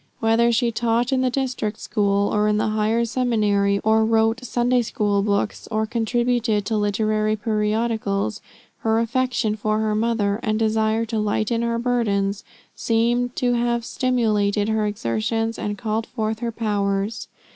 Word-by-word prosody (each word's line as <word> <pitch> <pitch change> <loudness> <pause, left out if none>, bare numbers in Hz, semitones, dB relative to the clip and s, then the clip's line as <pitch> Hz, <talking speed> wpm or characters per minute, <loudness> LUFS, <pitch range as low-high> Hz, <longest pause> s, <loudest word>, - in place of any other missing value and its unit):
Whether 230 +1 +3
she 235 0 +1
taught 235 +2 0
in 260 - +2
the 255 - +2
district 250 -5 -2
school, 200 -2 0
or 210 0 +2
in 210 0 +2
the 215 +1 0
higher 220 +2 +1
seminary, 210 -5 +1
or 220 0 +3
wrote 225 +2 +2
Sunday 245 +1 +1
school 205 -3 0
books, 200 +1 -1
or 220 0 0
contributed 235 -1 0
to 220 - -1
literary 215 +1 +1
periodicals, 215 -1 -1 0.4
her 225 0 +1
affection 240 -2 0
for 215 0 -1
her 215 -1 0
mother, 215 -2 0
and 215 -1 0
desire 220 0 +1
to 225 -1 -2
lighten 215 +2 0
her 235 0 0
burdens, 210 -5 0 0.3
seem 240 +2 +1
to 245 -1 +1
have 235 -1 0
stimulated 215 -5 0
her 220 -1 +1
exertions 210 - -2
and 205 0 -3
called 220 +1 -2
forth 220 -2 -3
her 235 -1 -2
powers. 205 -1 -2
220 Hz, 150 wpm, -22 LUFS, 210-235 Hz, 0.4 s, Whether